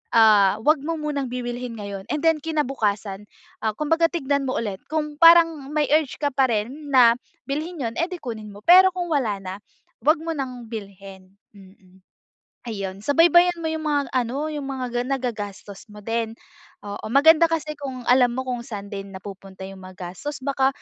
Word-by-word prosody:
ah, 210 -3 +6
huwag 305 +4 +3
mo 330 0 -1
munang 285 -4 -3
bibilhin 245 -1 -4
ngayon 200 -1 -6
and 300 0 -1
then 325 -1 +4
kinabukasan, 220 -10 -2 0.4
ah, 220 -1 0
kumbaga 325 +2 +2
tignan 280 -4 0
mo 255 - -1
ulit 205 -4 -4
kung 300 -1 -2
parang 330 -4 +6
may 300 -2 +1
urge 310 -4 0
ka 290 - +2
pa 265 -1 +3
rin 260 +8 -3
na 240 -3 +6 0.3
bilhin 310 +3 -4
yun, 230 -1 -3
eh, 335 - +2
di 360 - -5
kunin 220 -4 -7
mo. 205 - -12
Pero 375 +2 +8
kung 355 -1 -3
wala 230 -9 0
na, 185 -1 -6 0.5
huwag 310 +2 +4
mo 330 -1 -3
ng 255 -4 -5
bilhin, 195 -3 -10 0.2
mm. 190 -1 -19 0.7
Ayun, 195 -3 -5
subaybayan 345 - +4
mo 320 -1 -3
yung 315 -1 -3
mga 285 -2 0
ano, 260 +4 -1
yung 290 -2 -5
mga 255 -3 -4
ga 240 0 0
nagagastos 205 -4 -6
mo 210 -1 -13
din, 225 0 -2 0.5
oo. 205 0 -7
Maganda 320 +6 +6
kasi 310 -2 -2
kung 270 -4 -7
alam 245 0 +4
mo 260 - -2
kung 250 -2 -3
saan 205 -4 -8
din 195 -1 -7
napupunta 190 0 -10
yung 190 0 -9
mga 185 0 -12 0.2
gastos 280 +6 -7
baka, 270 -1 +2
255 Hz, 180 wpm, -23 LUFS, 205-300 Hz, 0.7 s, Pero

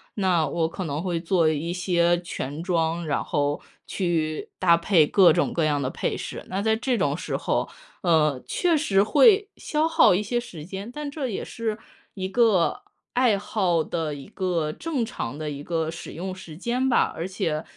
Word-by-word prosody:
那 185 -5 +2
我 165 -1 0
可 185 - -5
能 150 -2 -3
会 175 -2 -1
做 170 -1 +2
一 155 +2 -2
些 175 -1 +2
全 150 -3 -5
妆， 170 -1 0
然 145 - 0
后 145 0 -1 0.3
去 160 -4 -1
搭 170 -2 +5
配 170 -2 +3
各 185 -1 +6
种 175 - +1
各 170 - 0
样 145 -2 +1
的 130 - -1
配 - - -2
饰。 - - -7
那 195 +2 -2
在 220 +1 +2
这 245 +2 0
种 145 -7 +1
时 175 - -3
候 - - -1 0.3
呃， 150 -7 +2
确 350 -2 +1
实 205 -11 +3
会 415 - +5
消 310 +1 0
耗 325 - +5
一 185 - +1
些 230 +4 -2
时 160 -10 -9
间， 195 +5 -7
但 295 +2 -5
这 280 -3 -3
也 195 - -3
是 225 -2 -3 0.4
一 190 -2 -3
个 205 -4 +2 0.3
爱 245 -5 +3
好 185 -5 +1
的 160 -1 -3
一 140 -1 -9
个 175 -6 -2
正 285 -8 -2
常 130 - -5
的 155 -1 -4
一 145 0 -6
个 160 0 -1
使 170 +1 -7
用 185 +2 -5
时 165 -4 -11
间 245 +7 0
吧。 245 - +2
而 165 - -3
且 175 -5 -2
175 Hz, 205 characters per minute, -25 LUFS, 160-210 Hz, 0.4 s, 各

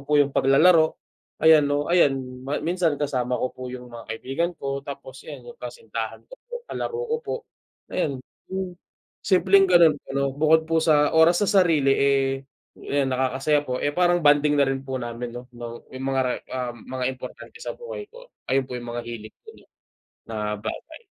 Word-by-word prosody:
po 150 - +4
yung 140 -1 +3
paglalaro, 160 +4 +5 0.5
ayan 160 -1 +8
'no, 145 +3 0
ayan 145 -6 +5 0.5
minsan 170 -3 +1
kasama 125 -4 -1
ko 125 - -2
po 130 0 -7
yung 125 -1 -9
mga 115 -3 -10
kaibigan 135 +9 -2
ko, 140 -1 -3
tapos 140 -2 -9
ayan, - - -8
yung 475 - -30
kasintahan 470 -2 -6
ko - - -15
po, - - -26 0.2
kalaro 460 - -3
ko - - +3
po, - - -4 0.6
'yon, 145 -7 0 0.3
mm, 190 -1 -3 0.5
simpleng 190 +1 +5
ganun 170 -4 +6
po - - -30
'no? 140 0 +1
Bukod 160 +2 +4
po 165 0 +2
sa 150 -2 +4
oras 170 +2 +6
sa - - -1
sarili, 165 -9 +4
eh, 140 -1 +3 0.5
yan 140 -1 -1
nakakasaya 135 +3 +1
po. 125 -2 -2
Eh, 145 - +1
parang 175 0 +4
bonding 145 0 +4
na - - +6
rin 135 0 -1
po 130 -1 -4
namin 120 0 -5
'no? 120 - -7
Nung 120 0 -7
yung 130 0 -6
mga, 130 -2 0
ah, 125 -2 -2
mga 130 +3 -5
importante 130 - -10
sa - - -3
buhay 480 -2 -7
ko. - - -13 0.2
Ayun 135 0 +3
po 125 - -5
yung 120 -1 -7
mga 120 0 -3
hiling 115 -2 -8
ko, - - -23 0.8
na 105 -1 -2
bagay. 315 - -7
140 Hz, 180 wpm, -24 LUFS, 130-170 Hz, 0.8 s, ayan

